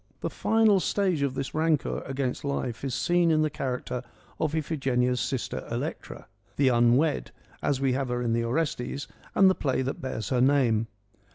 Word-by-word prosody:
The - - -2
final 220 -3 +3
stage 185 -4 0
of 140 -2 0
this 135 0 -4
rancour 155 -1 +1
against 135 -2 -2
life 130 -4 -3
is 135 -3 -2
seen 175 -1 +2
in 155 -1 +3
the 155 - 0
character 125 -3 -3 0.4
of 155 0 0
Iphigenia's 130 -5 0
sister 125 +3 -2
Electra - - -5
— - - -42
' - - -35
the 135 -2 +4
unwed 125 +5 +3
' - - -30
— - - -31
as 140 -2 0
we 135 -2 +1
have 135 0 -1
her 125 0 -1
in 115 -1 0
the 115 0 +1
Orestes 135 +1 -2 0.3
and 195 - +6
the 190 - +6
play 130 -6 -1
that 135 - -4
bears 120 -6 -4
her 125 -1 +2
name. 125 -5 +3
135 Hz, 195 wpm, -27 LUFS, 125-155 Hz, 0.4 s, and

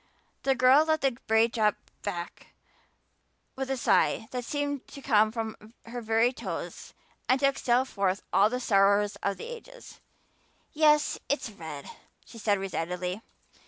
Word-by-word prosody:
The 270 -1 +2
girl 260 +4 +6
let 315 -1 +1
the 270 - +3 0.2
braid 220 +1 +4
drop 215 -3 +2 0.3
back 175 0 -6 1.1
with 265 0 -4
a 270 - -1
sigh 225 -2 +2
that 250 -1 -3
seemed 285 +1 -3
to 280 - -11
come 220 -5 +3
from 220 0 -6
her 240 +1 -6
very 225 +2 +2
toes - - -6 0.3
and 260 +1 +4
to 275 - +2
exhale 260 -2 +2
forth 195 -5 -1
all 195 +3 +5
the 250 +2 -2
sorrows 200 -2 +3
of 200 -1 -1
the - - -7
ages. 485 +1 -11 0.7
"Yes, 300 -1 +3
it's 285 -5 -1
red," 160 -7 -8 0.4
she 230 - -12
said 205 -2 +2
resignedly. 180 0 -3
230 Hz, 150 wpm, -28 LUFS, 205-270 Hz, 1.1 s, girl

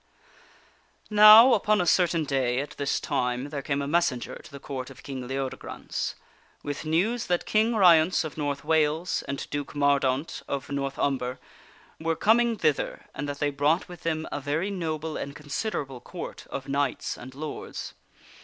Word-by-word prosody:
NOW, 215 +4 +9
upon 210 -1 +2
a 180 - +1
certain 175 -1 +3
day 130 -3 0
at 145 - -4
this 140 -1 -1
time 125 +2 -1
there 145 -1 -4
came 140 +1 -1
a - - -3
messenger 145 -6 0
to - - -15
the 140 - -9
Court 135 -2 -6
of 130 -2 -14
King 135 -3 -6
Leodegrance, 135 0 -4 0.5
with 145 +2 -5
news 195 +10 0
that 175 -1 0
King 220 +2 +2
Ryence 175 -4 +5
of 155 - -6
North 145 -2 -3
Wales 160 +2 +1
and 140 - -4
Duke 145 0 -4
Mordaunt 140 0 +1
of 140 0 -4
North 140 -1 -2
Umber 130 -2 -1 0.6
were 165 0 0
com 220 +7 +4
ing 235 -2 +1
thither 155 -6 0
and 145 +1 -4
that 140 - -4
they 145 0 0
brought 145 +6 +1
with 175 -3 -11
them 160 -2 -2
a - - -3
very 155 +8 -1
noble 160 -4 -3
and 140 +1 -5
considerable 145 - -4
Court - - -8
of 135 - -6
knights 140 -1 -1
and 130 +2 -11
lords. 150 +1 -6
145 Hz, 170 wpm, -27 LUFS, 140-170 Hz, 0.6 s, NOW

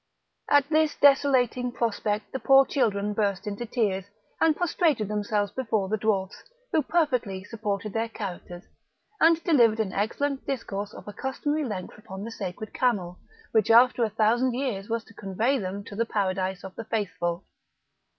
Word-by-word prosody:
At 285 -1 +5
this 310 -1 +2
desolating 260 -3 +3
prospect 215 -3 -2
the 265 - -3
poor 270 0 +6
children 210 -7 0
burst 200 -1 -1
into 210 +3 -4
tears, 200 -6 0 0.3
and 320 -2 +4
prostrated 315 - +1
themselves 210 -1 -1
before 220 -5 -1
the 215 - 0
dwarfs, 195 -3 -1 0.3
who 315 - +3
perfectly 250 - 0
supported 210 -1 -4
their 225 0 -1
characters, 180 -4 -7 0.6
and 330 0 +4
delivered 235 -9 +4
an 200 -4 -1
excellent 270 +7 -1
discourse 210 -6 -3
of - - -11
a 205 - -7
customary 290 +5 -2
length 205 -4 -6
upon 195 -2 -8
the 230 - -6
sacred 200 0 -6
camel, 190 -8 0 0.3
which 220 -3 +2
after 240 +1 +6
a 225 - +1
thousand 230 +4 +2
years 235 -7 -3
was 230 0 -1
to 225 - -18
convey 215 +7 0
them 195 0 -4
to 200 - -10
the 230 +2 0
paradise 190 -3 -1
of 190 -1 -8
the 230 - -7
faithful. 180 -5 -2
220 Hz, 160 wpm, -26 LUFS, 200-255 Hz, 0.6 s, poor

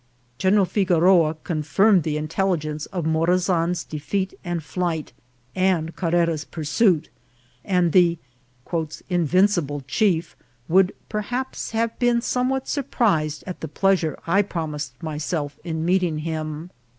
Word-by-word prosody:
General 195 +3 +4
Figo 180 -3 +1
roa 170 -3 +4
confirmed 175 +5 +3
the 150 -1 -2
intelligence 155 -2 -1
of 175 -5 -4
Morazan's 170 +1 +1
defeat 190 +6 -3
and 175 -3 -3
flight, 165 -3 -3 0.4
and 185 -4 +1
Carrera's 170 -3 +1
pursuit, 160 +2 +1 0.5
and 180 -3 +2
the 175 -1 +4 0.5
" 160 -1 -4
invincible 175 -3 +2
chief" 170 +2 +1 0.3
would 185 +2 +3
perhaps 245 +5 -3
have 225 0 -1
been 245 -1 +3
somewhat 255 +2 -1
surprised 195 - 0
at 185 - -7
the 160 - -3
pleasure 175 0 +1
I 195 +4 +3
promised 150 -9 -4
myself 150 -1 -3
in 160 -2 -3
meeting 180 -3 +1
him. 155 +1 -4
175 Hz, 120 wpm, -23 LUFS, 155-190 Hz, 0.5 s, General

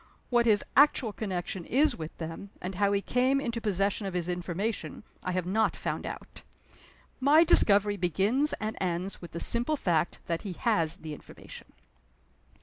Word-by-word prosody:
What 240 -1 +3
his 210 -2 +4
actual 270 -6 +4
connection 185 -3 -4
is 275 - +2
with 160 0 -8
them, 165 +4 -7
and 185 +2 -5
how 200 +2 +1
he 200 0 0
came 260 +2 +2
into 235 -4 -3
possession 200 0 -1
of 190 - -5
his 175 0 -2
information, 180 +6 -3 0.2
I 185 - -2
have 180 -1 -1
not 215 +5 +1
found - - -4
out. - - -9 0.8
My 290 +5 +6
discovery 205 -8 +5
begins 200 - +1
and 215 0 -4
ends 180 +1 -3
with 175 - -9
the 170 - -6
simple 240 - 0
fact 170 - 0
that 165 -1 -2
he 195 -4 -5
has 170 -6 +1
the 155 -1 -7
information." - - -12
200 Hz, 165 wpm, -28 LUFS, 175-235 Hz, 0.8 s, My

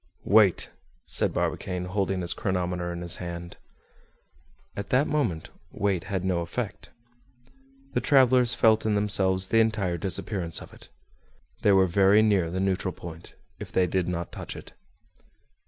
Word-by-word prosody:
"Wait!" 105 -3 +4 0.3
said - - 0
Barbicane, 90 -1 -2
holding 95 0 -1
his 85 -1 -1
chronometer 90 -2 -2
in 85 0 -5
his 85 0 0
hand. 85 -1 -7 1.2
At 100 0 -5
that 130 +3 +3
moment 130 - -1 0.2
weight 95 -3 -1
had 95 -2 -3
no 90 -2 +1
effect. 100 +5 -5 1.0
The - - +1
travelers 130 -3 +4
felt 110 -2 +4
in 110 -1 +1
themselves 95 -2 +1
the 115 - +4
entire 105 -6 +1
disappearance 95 -3 -2
of - - -12
it. - - -12 0.7
They 105 - +4
were 95 -1 +5
very 100 +4 +4
near 100 -6 +2
the 90 +2 -3
neutral 95 -1 -1
point, 85 0 -10 0.2
if - - -8
they 95 - +3
did 90 0 -1
not 85 -1 -3
touch - - -7
it. - - -11
95 Hz, 150 wpm, -26 LUFS, 90-105 Hz, 1.2 s, were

